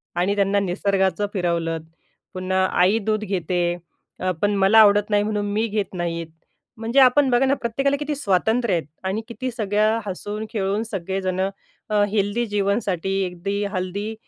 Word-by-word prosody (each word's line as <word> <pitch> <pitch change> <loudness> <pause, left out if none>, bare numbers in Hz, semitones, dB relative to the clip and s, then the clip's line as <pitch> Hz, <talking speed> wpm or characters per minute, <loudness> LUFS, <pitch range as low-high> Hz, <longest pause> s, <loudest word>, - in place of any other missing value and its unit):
आणि 180 +3 +1
त्यांना 200 0 +2
निसर्गाचं 195 +1 0
फिरवलंत. 170 -4 -1 0.5
पुन्हा 185 0 0 0.2
आई 195 +5 +4
दूध 215 -1 0
घेते 180 -2 -1 0.6
अ, 185 0 0
पण 205 0 +2
मला 195 +3 +5
आवडत 205 -1 +5
नाही 205 -1 +3
म्हणून 210 -1 -1
मी 220 +2 +1
घेत 210 -3 -2
नाही 170 -2 -3 0.5
म्हणजे 230 +4 +1
आपण 265 +1 +5
बघा 245 +2 +3
ना 265 - +3
प्रत्येकाला 275 +3 0
किती 295 0 -2
स्वातंत्र्य 220 -2 +1
आहेत 170 -2 0 0.2
आणि 195 +4 -1
किती 255 +2 -4
सगळ्या 215 0 +1
हसून 205 +2 -5
खेळून 205 -1 -1
सगळेजणं 190 -2 -2 0.4
अ, 210 -1 +2
हेल्दी 205 +3 0
जीवनसाठी 200 -3 -1
अगदी 195 +3 -3
हेल्दी 200 +2 -3
205 Hz, 150 wpm, -22 LUFS, 190-220 Hz, 0.6 s, मला